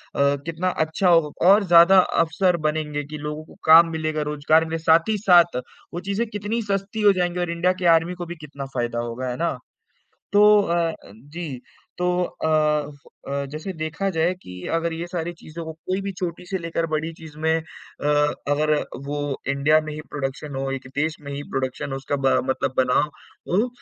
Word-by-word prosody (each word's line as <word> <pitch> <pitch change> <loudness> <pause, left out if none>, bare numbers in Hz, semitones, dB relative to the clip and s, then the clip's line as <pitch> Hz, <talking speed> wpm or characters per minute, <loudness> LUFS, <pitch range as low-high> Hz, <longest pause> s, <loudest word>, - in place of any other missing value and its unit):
अ, 140 0 +3
कितना 165 +2 -1
अच्छा 160 +3 0
होगा 165 -1 +3
और 205 +2 +6
ज़्यादा 175 +1 +7
अवसर 175 +1 +2
बनेंगे 150 -1 -2
कि 150 +2 -8
लोगों 150 +1 -5
को - - -17
काम 165 +1 +8
मिलेगा, 155 -1 -2
रोजगार 150 +2 +2
मिलेगा, 165 0 -4
साथ 165 +4 +4
ही 215 - +1
साथ 175 - +5 0.4
वो 175 - -3
चीज़ें 200 +5 -1
कितनी 210 +2 -2
सस्ती 200 0 +1
जाएँगी 180 -1 -1
और 175 -1 -1
इंडिया 175 +2 +1
के 180 - -3
आर्मी 165 +2 -3
को 175 -1 -6
भी 175 +1 -7
कितना 140 -1 -7
फायदा 120 -1 -1
होगा, 120 +2 -4
है 125 - -3
ना? 165 -5 -1 0.8
तो 210 0 +7
अ 170 -4 -1
अ, 160 - -10
जी 145 +2 -8 0.4
तो 180 - -1 0.2
अ 170 - -4 0.8
अ, 140 0 -2
जैसे 155 +6 -5
देखा 165 +5 -2
जाए 170 0 +1
कि 90 - -11 0.2
अगर 165 0 0
ये 165 +2 -5
सारी 175 -1 -3
चीज़ों 165 +2 -8
को 160 - -5
कोई 185 +4 -4
भी 200 0 -3
छोटी 180 0 -4
से 190 - -2
लेकर 165 -1 -2
बड़ी 155 +2 -1
चीज़ 160 -2 -13
में 160 +1 +2
अ, 160 - -10 0.9
अगर 150 +1 +2 0.3
वो 145 +1 -3 0.3
इंडिया 140 +3 +3
में 155 - -6
ही 150 - -7
प्रोडक्शन 140 0 -5
हो, 135 0 -2
एक 135 -1 -5
देश 155 +2 0
में 140 -1 -8
ही 140 - -4
प्रोडक्शन 130 +1 -3
हो 135 - -2
उसका 135 +1 -3
ब 135 -1 0 0.2
मतलब 130 0 -1
बना 125 -1 +3 0.5
हो 210 +7 +2
160 Hz, 195 wpm, -23 LUFS, 145-180 Hz, 0.9 s, काम